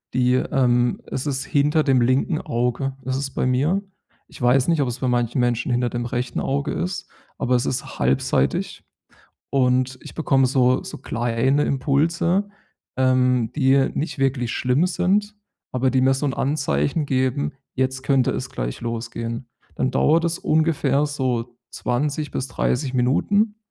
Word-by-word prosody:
die, 125 0 +3
ähm 125 -2 +1
es 135 +3 -4
ist 135 +1 -2
hinter 150 +1 +2
dem 130 -3 +3
linken 130 +6 +1
Auge 125 0 -1
ist 130 0 -1
es 135 -1 -3
bei - - -1
mir. 145 +10 +1 0.5
Ich - - -14
weiß 125 +3 +3
nicht, 165 -4 +2
ob 135 - +1
es 120 +1 -4
bei 130 - -1
manchen 120 +1 0
Menschen 120 +1 0
hinter 120 0 +1
dem 120 0 -3
rechten 125 +1 -2
Auge 140 +2 -1
ist, 180 +1 -3 0.3
aber 125 0 +1
es 125 - +1
ist 125 - -4
halbseitig. 65 +1 0 0.7
Und 130 -1 +1
ich - - -11
bekomme 135 -4 +2
so 130 -1 +2
so - - -8
kleine 120 +4 0
Impulse, 165 +8 +1 0.5
ähm, 125 -2 +2
die 135 -1 +3
nicht 155 -1 -3
wirklich 130 -3 0
schlimm 130 +8 +1
sind, 200 +4 0 0.4
aber 130 +1 +1
die 130 - +2
mir 130 +1 +4
so 145 +2 -2
'n 135 - -1
Anzeichen 140 - 0
geben, 130 +1 0 0.2
jetzt 130 0 -1
könnte 135 -2 +2
es - - -4
gleich - - -4
losgehen. 115 +1 -4 0.3
Dann 130 - 0
dauert 165 +2 +3
es 170 +1 -1
ungefähr 150 -3 +2
so 125 -4 -2
20 145 +3 -2
bis 130 - -3
30 130 +2 -1
Minuten, 200 - +2
130 Hz, 160 wpm, -22 LUFS, 125-145 Hz, 0.7 s, mir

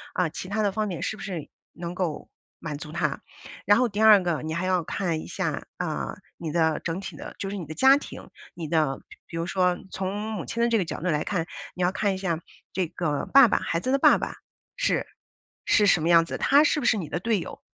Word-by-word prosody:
啊， 180 -3 +1
其 165 - -7
它 215 +2 0
的 205 - +2
方 215 +2 -1
面， 180 -5 -4
是 220 - -2
不 - - -11
是 180 -7 -5 0.2
能 170 0 -6
够 180 -5 -3 0.3
满 155 -3 -5
足 150 - -8
他。 170 +2 -1 0.4
然 205 - +6
后 250 +1 +3
第 205 +1 -3
二 215 -3 +8
个， 170 -4 -1
你 160 0 -3
还 175 +2 -1
要 185 -2 +1
看 165 -1 -2
一 - - -9
下， - - -3
啊， - - -3 0.2
你 160 -2 -5
的 160 -1 +2
整 170 +2 -3
体 195 - -7
的 - - -9
就 195 - -3
是 205 - -4
你 175 - -5
的 155 - -7
家 265 - +6
庭， - - -9 0.3
你 170 -2 -5
的 150 -4 +1
比 - - -14
比 165 - -6
如 165 - -1
说 180 0 +1
从 190 +1 -3 0.2
母 190 -6 -4
亲 235 - -1
的 - - +4
这 230 - +3
个 185 - 0
角 - - -5
度 180 - -2
来 150 -2 +1
看， 180 -5 -1 0.3
你 180 - -1
要 175 - +3
看 200 0 0
一 - - -5
下 175 -4 -1 0.3
这 185 -2 0
个 155 -4 -2
爸 275 -2 +9
爸， - - +1
孩 165 - -1
子 255 - -2
的 275 - +3
爸 - - +6
爸， - - -4 0.4
是 - - +1 0.6
是 210 - +4
什 175 - +4
么 165 - +1
样 165 -1 +6
子， - - -5
他 285 +2 +5
是 305 0 +2
不 265 - -3
是 220 - +4
你 175 -6 -4
的 175 - -2
队 220 +2 +1
友， - - -8
180 Hz, 275 characters per minute, -26 LUFS, 165-205 Hz, 0.6 s, 爸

